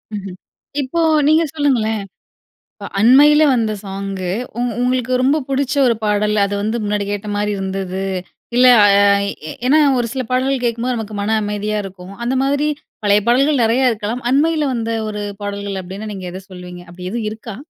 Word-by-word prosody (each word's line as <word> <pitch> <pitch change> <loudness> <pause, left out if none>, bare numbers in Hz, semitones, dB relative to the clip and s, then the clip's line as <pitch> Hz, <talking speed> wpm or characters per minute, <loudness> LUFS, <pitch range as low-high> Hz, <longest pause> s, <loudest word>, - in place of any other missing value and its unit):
ம்ஹ்ம். 195 -2 -6 0.5
இப்போ 280 +6 -2 0.3
நீங்க 315 +2 +4
சொல்லுங்களேன். 240 -8 +1 0.7
இப்ப 200 - -8
அண்மைல 290 +7 +6
வந்த 225 -3 +1
சாங்கு, 195 -1 -4 0.3
உங் 245 0 0
உங்களுக்கு 255 0 0
ரொம்ப 275 +4 +3
புடுச்ச 275 0 -1
ஒரு 235 - +2
பாடல், 210 0 +1
அது 200 - -4
வந்து 220 +3 -1
முன்னாடி 205 -1 -1
கேட்ட 205 +1 -4
மாதிரி 210 0 -1
இருந்துது. 190 0 -3 0.5
இல்ல 255 +1 +6 0.2
அ - - +7 0.6
எ - - -5
ஏன்னா, 290 +5 +5 0.2
ஒரு 240 -1 0
சில 265 - -2
பாடல்கள் 255 0 0
கேட்கும்போது 235 +1 -1
நமக்கு 215 -1 -6
மன 220 +2 +1
அமைதியா 210 0 -2
இருக்கும். 190 0 -10
அந்த 255 +2 0
மாதிரி 285 +2 +1 0.4
பழைய 205 0 +4
பாடல்கள் 270 +2 +3
நெறையா 240 +4 +2
இருக்கலாம். 225 +3 -4
அண்மைல 310 +3 +2
வந்த 230 -1 -2 0.2
ஒரு 210 0 -5 0.2
பாடல்கள் 200 -1 -4
அப்படீன்னா 195 +4 -7
நீங்க 190 -2 -7
எதை 185 - -8
சொல்லுவீங்க? 180 -1 -10
அப்படீ 180 +1 -8
எதுவும் 230 -2 -3
இருக்கா? 220 -1 -8
220 Hz, 165 wpm, -18 LUFS, 200-255 Hz, 0.7 s, அ